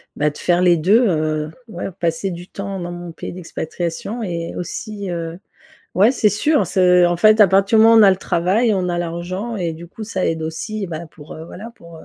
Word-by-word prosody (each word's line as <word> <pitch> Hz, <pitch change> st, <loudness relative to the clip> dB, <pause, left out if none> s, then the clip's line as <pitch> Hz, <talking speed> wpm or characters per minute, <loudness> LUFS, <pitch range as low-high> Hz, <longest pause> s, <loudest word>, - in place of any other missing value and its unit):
bah, 150 Hz, +1 st, +1 dB
de 150 Hz, -, -11 dB
faire 175 Hz, 0 st, +1 dB
les 175 Hz, -1 st, +4 dB
2, 205 Hz, +10 st, +4 dB
heu, 155 Hz, -3 st, -1 dB, 0.2 s
ouais 215 Hz, -, -6 dB
passer 170 Hz, +2 st, -2 dB
du 175 Hz, +1 st, -8 dB
temps 195 Hz, -1 st, -6 dB
dans 175 Hz, 0 st, -5 dB
mon 175 Hz, -1 st, -7 dB
pays -, -, -8 dB
d'expatriation 175 Hz, +5 st, -5 dB
et 170 Hz, -3 st, -4 dB
aussi, 200 Hz, +3 st, -5 dB
heu 165 Hz, 0 st, -5 dB, 0.6 s
ouais 205 Hz, +6 st, +5 dB
c'est 220 Hz, -4 st, +3 dB
sûr, 285 Hz, +10 st, +1 dB
c'est 180 Hz, -2 st, +4 dB
en 175 Hz, 0 st, 0 dB
fait 215 Hz, +5 st, +5 dB
à 205 Hz, -, +8 dB
partir 195 Hz, +4 st, +3 dB
du -, -, +7 dB
moment 225 Hz, +1 st, +7 dB
où -, -, +8 dB
on -, -, +8 dB
a 200 Hz, -, +7 dB
le 190 Hz, -, +2 dB
travail, 190 Hz, +5 st, +1 dB
on 185 Hz, -2 st, -1 dB
a 175 Hz, -, -1 dB
l'argent 175 Hz, +7 st, -4 dB
et 170 Hz, -4 st, -2 dB
du 170 Hz, +2 st, -10 dB
coup 215 Hz, +5 st, -8 dB
ça 190 Hz, -4 st, -2 dB
aide 160 Hz, -1 st, -2 dB
aussi. 195 Hz, +6 st, -4 dB
Bah, 165 Hz, 0 st, -6 dB
pour 150 Hz, -1 st, -13 dB
heu, 160 Hz, -, -9 dB
voilà 220 Hz, +7 st, -10 dB
pour 170 Hz, -1 st, -14 dB
heu, 160 Hz, -, -13 dB
180 Hz, 235 wpm, -19 LUFS, 170-205 Hz, 0.6 s, à